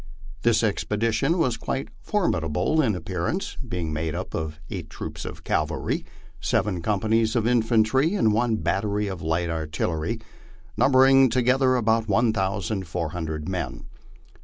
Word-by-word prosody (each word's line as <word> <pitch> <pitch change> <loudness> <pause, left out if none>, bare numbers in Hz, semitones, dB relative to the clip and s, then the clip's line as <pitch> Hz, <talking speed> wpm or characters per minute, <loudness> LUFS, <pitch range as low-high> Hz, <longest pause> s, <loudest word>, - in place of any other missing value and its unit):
This 115 -1 +3
expedition 115 - +1
was 130 -8 +1
quite 135 - -3
formida 85 - 0
ble 155 - +2
in 110 -8 +1
appearance, 90 - -3
being 90 - -4
made 80 0 -2
up - - -5
of 75 -1 -4
eight 90 -7 -5
troops - - -7
of - - -8
cavalry, - - -1 0.4
seven 95 -5 0
companies 110 +3 +1
of 115 -2 +1
infantry, 120 - +3
and 110 - +3
one 115 +1 +2
battery 100 +4 0
of 95 -3 -5
light 80 +2 0
artillery, 80 +5 -2 0.6
numbering 135 0 +6
altogether 130 +1 +3
about 115 -2 +2
1,400 95 -7 -1
men. 95 -2 -4
105 Hz, 130 wpm, -25 LUFS, 85-120 Hz, 0.6 s, numbering